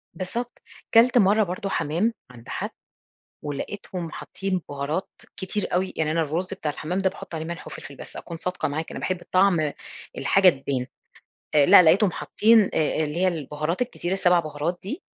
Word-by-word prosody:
بالضبط، 235 +6 -5 0.3
كلت 240 +2 +6
مرَّه 210 0 +5
برضه 185 +2 -4
حمام، 185 +6 0 0.2
عند 120 -1 -14
حد - - -3 0.7
ولقيتهم 170 +3 -5
حاطين 190 +2 -3
بُهارات 145 +6 -3 0.3
كتير 195 +2 -3
أوي، 185 +1 0
يعني 155 -1 +1
أنا 165 +1 +1
الرز 170 +5 -2
بتاع 155 -6 -3
الحمام 160 +5 -3
ده 190 -1 +2
باحط 190 -3 -9
عليه 160 0 -4
ملح 170 +1 -6
وفلفل، 140 - -9
بس - - -9
أكون 170 -1 -7
صادقة 180 +2 -2
معاك 155 +3 -4
أنا - - -6
باحب 185 -1 -2
طعم 180 -6 +3 0.4
الحاجة 195 -1 +5
تبان، 135 -4 -2 0.7
آآ، 145 -2 +6
لأ - - +9
لقيتهم 185 +4 +5
حاطين 225 +2 +4 0.2
آآ 155 0 +1
اللي 150 0 -3
هي 185 +2 +3
البُهارات 155 - -2
الكتير 190 -7 -3
السبع 180 -2 +4
بُهارات 155 +3 -3
دي، 200 - -5
175 Hz, 170 wpm, -24 LUFS, 155-195 Hz, 0.7 s, لأ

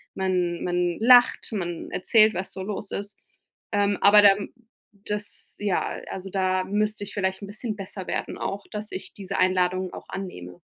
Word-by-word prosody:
man 180 -2 0
man 175 -1 0
lacht, 245 +2 +6
man 175 -5 -4
erzählt, 215 +3 +4
was 185 +2 -4
so 190 - -5
los 205 0 -4
ist. 200 0 -4 0.6
Ähm, 205 -1 +2
aber 210 +1 +8
dann 200 0 +5 0.6
das 210 0 -4
ja 205 -3 +1 0.3
also, 190 0 -6
da 185 -1 +1
müsste 210 +2 -1
ich - - -9
vielleicht 190 -1 -1
'n 200 - -7
bisschen 215 +2 -4
besser 195 -1 -7
werden - - -3
auch, 200 0 -4
dass 210 0 -6
ich 185 - -6
diese 195 -2 -5
Einladungen 185 0 +1
auch - - -10
annehme. 90 - -7
195 Hz, 170 wpm, -25 LUFS, 185-205 Hz, 0.6 s, aber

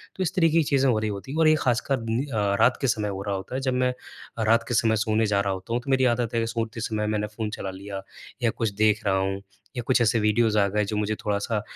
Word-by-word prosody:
तो 190 - -1
इस 185 +1 -2
तरीके 165 -3 +3
की 165 - +4
चीज़ें 135 -2 +2
हो 115 - +2
रही 110 0 -1
होती 100 +6 -6
हैं, 155 - -2
और 160 - +5
ये 155 - +6
ख़ासकर 130 +2 +1
नि 120 +5 0
अ, - - -12 0.3
रात 125 +3 +4
के 135 - +1
समय 105 -3 0
हो 95 -1 -5
रहा 100 -1 -2
होता 95 +6 -6
है। 135 - -2
जब 130 -1 0
मैं 125 0 +1 0.4
अ, 110 - -1
रात 115 +2 +3
के - - -2
समय 110 -1 +3
सोने 110 0 +1
जा 105 -2 +1
रहा 100 -1 -1
होता 95 +4 -6
हूँ, 120 - 0
तो 140 - -2
मेरी 130 -1 +3
आदत 120 -1 -3
है 115 -1 +1
सोते 115 0 -3
समय 105 -1 -2
मैंने 105 0 -1
फ़ोन 105 +1 -4
चला 100 -2 -5
लिया, 95 +1 -7 0.4
या 120 - +4
कुछ 110 -1 -2
देख 110 0 +2
रहा 95 -1 +2
हूँ, 95 +1 -1 0.4
या - - 0
कुछ 130 -2 +3
ऐसे 115 0 +3
वीडियोज़ 110 +1 +2
आ 100 - +3
गए 105 +2 0
जो 105 - -3
मुझे 105 +1 0
थोड़ा-सा 105 +1 -1
110 Hz, 285 wpm, -25 LUFS, 105-125 Hz, 0.4 s, ये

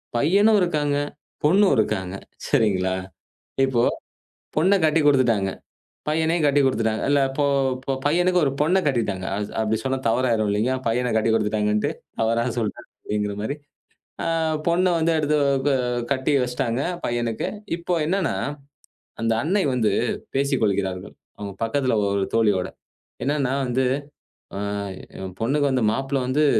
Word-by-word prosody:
பையனும் 200 - +4
இருக்காங்க, 150 -5 +1 0.5
பொண்ணும் 190 +3 +5
இருக்காங்க. 95 -4 0 0.3
சரிங்களா? 95 -4 +2 0.7
இப்போ 130 -3 +1 0.7
பொண்ண 185 +6 +4
கட்டிக்குடுத்துட்டாங்க. 135 -10 +3 0.6
பையனையும் 160 +1 +1
கட்டிக்குடுத்துட்டாங்க. 130 -6 +2
இல்ல 145 0 +4
இப்போ 145 +2 0 0.4
போ - - -1
பையனுக்கு 180 +4 +3
ஒரு 135 - +1
பொண்ணை 180 +6 +3
கட்டிட்டாங்க. 105 -8 -1
அ - - -2 0.2
அப்டி 110 0 0
சொன்னா 130 0 0
தவறாயிரும் 115 -3 +1
இல்லையா! 110 +6 +1
பையன 125 +1 0
கட்டிக்குடுத்துட்டாங்கன்னுட்டு, 105 -1 +1 0.3
தவறா 115 +1 +2
சொல்ட்டேன் 110 -3 -3
அப்படிங்கிற 105 -1 -2
மாரி. 110 +7 -2 0.7
ஆ - - -2 0.4
பொண்ண 180 +2 +3
வந்து 165 +1 +2
எடுத்து 150 0 +1 0.3
க - - +2 0.4
கட்டி 130 +2 0
வச்சிட்டாங்க, 125 0 -1 0.2
பையனுக்கு. 120 -2 -1 0.3
இப்போ 175 +1 -2
என்னான்னா, 190 +1 0 0.9
அந்த 115 0 +2
அன்னை 190 +5 +1
வந்து 115 -4 +2 0.4
பேசிக் 140 -1 +1
கொள்கிறார்கள். 95 -2 -1 0.2
அவுங்க 100 -1 -6
பக்கத்துல 130 +2 +1 0.2
ஒரு 100 -1 +1
தோழியோட. 105 -5 +2 0.6
என்னான்னா 140 -1 0
வந்து, 130 +1 0 0.7
ஆ - - -3 0.6
"என் 95 -1 -7
பொண்ணுக்கு 140 +5 +2
வந்து 130 -3 +1
மாப்பிள்ளை 135 +3 -1
வந்து" 145 +4 +2
130 Hz, 125 wpm, -23 LUFS, 110-150 Hz, 0.9 s, பொண்ணும்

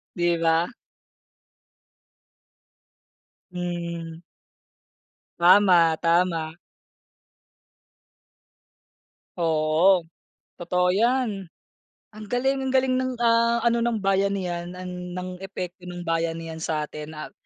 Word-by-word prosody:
'Di 175 -1 +1
ba? 165 +1 +2 2.8
Mhm. 170 -2 -5 1.2
Tama, 175 -2 +5
tama. 165 -2 +1 2.8
Oo, 165 +2 +3 0.5
totoo 180 +1 0
yan 220 0 +1 0.7
ang 215 -1 -10
galing 265 +4 0
ang 265 - -2
galing 260 0 +2
ng, 260 0 -2
ah, 235 0 +3
ano, 235 0 +2
ng 235 0 0
bayanihan 190 -3 -1
ang 180 -1 -7
ng 180 0 -6
epekto 180 -1 -7
ng 175 0 -7
bayanihan 165 -1 -2
sa 155 -1 -1
atin 150 +1 -9
at 155 - -8
180 Hz, 85 wpm, -24 LUFS, 165-200 Hz, 2.8 s, Tama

